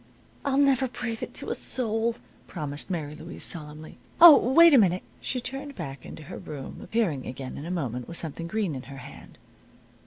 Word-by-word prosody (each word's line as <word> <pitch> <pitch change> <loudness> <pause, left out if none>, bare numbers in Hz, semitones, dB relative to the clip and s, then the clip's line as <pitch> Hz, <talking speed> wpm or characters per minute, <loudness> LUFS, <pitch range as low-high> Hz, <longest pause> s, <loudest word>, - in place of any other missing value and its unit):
"I'll 275 -1 0
never 275 -2 +4
breathe 240 -2 -5
it - - -6
to - - -5
a - - +1
soul," 230 -1 -2 0.3
promised 145 -1 -3
Mary 155 -5 -3
Louise, 160 +2 -7
solemnly. 155 -1 -4 0.2
"Oh, 335 -3 +12 0.2
wait 335 +3 +8
a 270 - +8
minute." 185 -3 +2 0.2
She 255 - -3
turned 270 +3 -6
back 135 0 -7
into 155 - -9
her - - -8
room, 140 -3 -8
appearing 180 - -1
again 130 0 -6
in 150 - -7
a - - -5
moment 125 -9 -3
with 170 - -4
something 165 +1 -5
green 205 -3 -1
in 130 - -5
her 135 - -9
hand. 135 +2 -12
175 Hz, 190 wpm, -27 LUFS, 145-245 Hz, 0.3 s, Oh